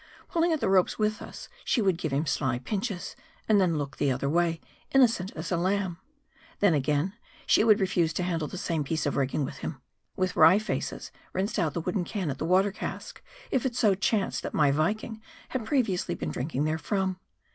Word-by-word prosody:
Pulling 335 0 +2
at 315 - +1
the - - 0
ropes 190 -1 +3
with 215 0 0
us, - - -9 0.2
she - - +1
would 195 -5 +3
give 155 -4 -2
him 140 +4 0
sly 130 -4 0
pinches, 195 - -4 0.3
and 210 -2 +5
then 170 -4 +2
look 140 -2 -5
another 135 -1 +1
way, 165 +2 +1 0.3
innocent 230 -8 +4
as 160 +3 -5
a 175 - +2
lamb. 185 0 0 0.6
Then 200 -4 +4
again, 150 +5 +1 0.3
she - - +4
would 220 -1 +5
refuse 180 -4 +1
to 180 - -1
handle 165 -4 -1
the 185 - -7
same 165 -4 -1
piece 155 +2 -2
of 145 - 0
rigging 140 +1 0
with 135 - -7
him; 135 0 -5 0.4
with 185 -1 -1
wry 165 +4 +7
faces, 215 +2 -3 0.2
rinsed 195 +3 -1
out 160 -5 0
the 170 - -1
wooden 185 +3 -1
can 185 -5 -3
at 135 - -7
the - - -2
water 190 +4 +3
cask, - - -6 0.3
if 260 - +1
it 250 -3 -1
so 215 -5 +4
chanced 195 +1 0
that - - -5
my 145 -2 +4
Viking 215 +9 -1 0.3
had 255 -4 -3
previ 240 -5 +2
ously 175 - -2
been 80 -2 -4
drinking 135 - -2
therefrom. 185 +4 -1
180 Hz, 205 wpm, -28 LUFS, 155-205 Hz, 0.6 s, wry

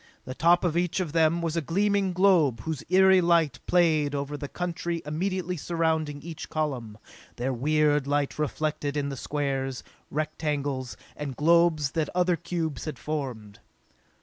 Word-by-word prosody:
The 130 - -5
top 170 +5 +3
of 170 -3 0
each 175 +1 0
of 175 -5 -2
them 165 +1 +2
was 165 -1 -1
a 165 - +1
gleaming 200 +5 +1
globe 175 - +3
whose 160 -4 -4
eery 190 0 +6
light 170 -6 +2
played 155 -5 +3
over 140 +1 -3
the 145 0 -5
country 170 0 -3
immediately 180 +4 -2
surrounding 160 -3 -1
each 165 -1 -7
column, 130 -9 -3 0.4
their 130 +2 -2
weird 150 +2 +2
light 145 0 0
reflected 150 -1 -2
in 140 -1 -1
the 135 - -4
squares, 135 -2 -2 0.3
rectangles 145 -4 -2 0.2
and 140 -3 -5
globes 165 -2 +3
that 160 -3 -1
other 180 -1 +3
cubes 165 -4 -4
had 155 - -5
formed. 125 -9 -5
155 Hz, 150 wpm, -27 LUFS, 145-170 Hz, 0.4 s, eery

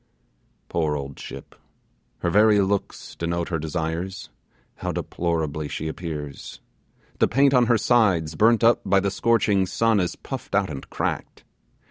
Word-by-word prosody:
Poor 80 -3 0
old 70 -1 -6
ship! - - -9 0.7
Her 85 - 0
very 105 +2 +5
looks 100 0 -2
denote 85 0 -2
her 80 -3 -1
desires! 80 +4 -4 0.5
how - - -3
deplorably 80 -3 -2
she 80 - -4
appears! 80 -3 -6 0.6
The - - +4
paint 140 +3 +3
on 125 -2 +4
her 115 - +4
sides, 100 -8 +2
burnt 110 +7 +3
up 115 +1 +5
by 100 +1 +3
the 100 0 -1
scorching 105 -3 +2
sun, 115 +2 +2
is 90 -2 -1
puffed 130 -6 -6
out 100 -4 +1
and 70 - -8
cracked. - - -4
95 Hz, 145 wpm, -24 LUFS, 80-110 Hz, 0.7 s, very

